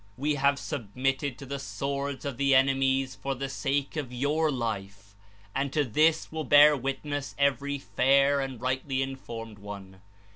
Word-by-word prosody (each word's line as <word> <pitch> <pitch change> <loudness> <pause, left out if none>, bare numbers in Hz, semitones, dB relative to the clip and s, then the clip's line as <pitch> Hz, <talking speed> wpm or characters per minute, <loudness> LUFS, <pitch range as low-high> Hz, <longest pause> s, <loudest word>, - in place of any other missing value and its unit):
We 150 +3 0
have 140 0 +2
submitted 135 +1 -2
to 140 - -9
the 140 +1 -5
swords 140 0 -4
of 140 -4 -4
the 140 0 +3
enemies 135 0 +2
for 135 0 -4
the 135 +2 -4
sake 140 +1 -1
of 145 -5 -4
your 145 +5 +1
life, 100 -5 -4 0.4
and 135 0 -1
to 150 - +2
this 155 +6 +2
will 160 0 -3
bear 145 +2 +7
witness 135 +1 -4
every 140 0 +1
fair 140 +1 +3
and 135 -3 -4
rightly 130 +2 -1
informed 115 -5 -7
one. 100 -2 -9
135 Hz, 155 wpm, -28 LUFS, 130-140 Hz, 0.4 s, bear